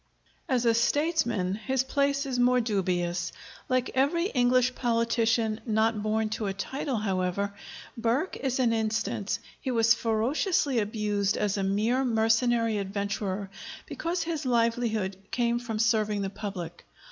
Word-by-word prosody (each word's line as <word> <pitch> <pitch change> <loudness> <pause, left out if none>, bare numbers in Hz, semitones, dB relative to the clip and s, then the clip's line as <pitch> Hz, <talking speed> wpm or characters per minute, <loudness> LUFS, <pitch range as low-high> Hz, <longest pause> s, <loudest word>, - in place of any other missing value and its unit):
As 250 -2 +1
a 230 - +5
statesman 235 - +1
his 260 +5 -1
place 280 +1 0
is 255 -2 -2
more 250 +1 +4
dubious. 180 -5 -1 0.4
Like 255 -1 +1
every 285 +7 +2
English 250 - +3
politician 230 -2 +1
not 220 -1 +1
born 215 +1 0
to 215 -1 -3
a 195 - -3
title, 265 +6 -3
however, 195 -1 -1 0.4
Burke 240 +9 0
is 265 -2 -2
an 240 -3 +3
instance, 220 -2 -1 0.2
he 265 - -4
was 230 -2 +4
ferociously 245 - +1
abused 210 -1 0
as 205 -2 0
a 200 - -1
mere 215 +7 +1
mercenary 230 -1 +2
adventurer 200 0 -3 0.3
because 340 0 -2
his 325 -2 -3
livelihood 230 -5 0
came 235 -1 +1
from 230 -3 -4
serving 215 -2 +1
the 195 - -3
public. 185 -5 -6
225 Hz, 135 wpm, -28 LUFS, 205-250 Hz, 0.4 s, a